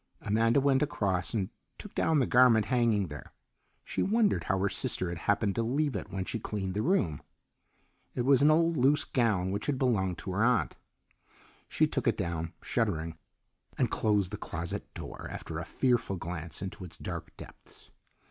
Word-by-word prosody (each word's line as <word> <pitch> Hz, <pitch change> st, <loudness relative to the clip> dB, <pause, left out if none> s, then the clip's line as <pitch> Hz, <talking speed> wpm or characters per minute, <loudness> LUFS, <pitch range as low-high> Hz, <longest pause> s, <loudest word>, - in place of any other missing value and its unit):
Amanda 115 Hz, +5 st, +2 dB
went 135 Hz, -1 st, +3 dB
across 95 Hz, -11 st, 0 dB
and 100 Hz, -5 st, -1 dB, 0.3 s
took -, -, -10 dB
down 160 Hz, -, +2 dB
the 135 Hz, -, +3 dB
garment 120 Hz, -4 st, +5 dB
hanging 115 Hz, -6 st, +2 dB
there. 75 Hz, 0 st, -9 dB, 0.5 s
She -, -, -2 dB
wondered 215 Hz, 0 st, +2 dB
how 95 Hz, -, +1 dB
her 95 Hz, +1 st, +1 dB
sister 90 Hz, -2 st, -1 dB
had 85 Hz, -1 st, -5 dB
happened 100 Hz, 0 st, +2 dB
to 115 Hz, -, -1 dB
leave 135 Hz, +3 st, 0 dB
it 100 Hz, -, -4 dB
when 95 Hz, -1 st, -3 dB
she 115 Hz, -, -3 dB
cleaned 100 Hz, -3 st, -3 dB
the 105 Hz, -, -1 dB
room. 110 Hz, -, +1 dB, 0.9 s
It 120 Hz, -, 0 dB
was 135 Hz, 0 st, +5 dB
an 145 Hz, -, +6 dB
old 165 Hz, +1 st, +3 dB
loose 140 Hz, +3 st, +4 dB
gown 105 Hz, -7 st, +1 dB
which 100 Hz, +2 st, -3 dB
had 145 Hz, -3 st, 0 dB
belonged 95 Hz, -9 st, +1 dB
to 95 Hz, -, -6 dB
her 100 Hz, +4 st, +1 dB
aunt. 115 Hz, -, +2 dB, 0.9 s
She -, -, +3 dB
took -, -, -2 dB
it -, -, +2 dB
down, 85 Hz, 0 st, -3 dB
shuddering, 80 Hz, 0 st, -1 dB, 0.6 s
and -, -, +1 dB
closed 105 Hz, -3 st, +1 dB
the 105 Hz, -, -4 dB
closet 85 Hz, -1 st, -5 dB
door -, -, -7 dB
after 80 Hz, -1 st, -6 dB
a 85 Hz, -, -5 dB
fearful 120 Hz, -6 st, +1 dB
glance 85 Hz, -1 st, -5 dB
into 95 Hz, -1 st, -6 dB
its 90 Hz, -, -10 dB
dark -, -, -7 dB
depths. -, -, -13 dB
105 Hz, 180 wpm, -30 LUFS, 90-130 Hz, 0.9 s, an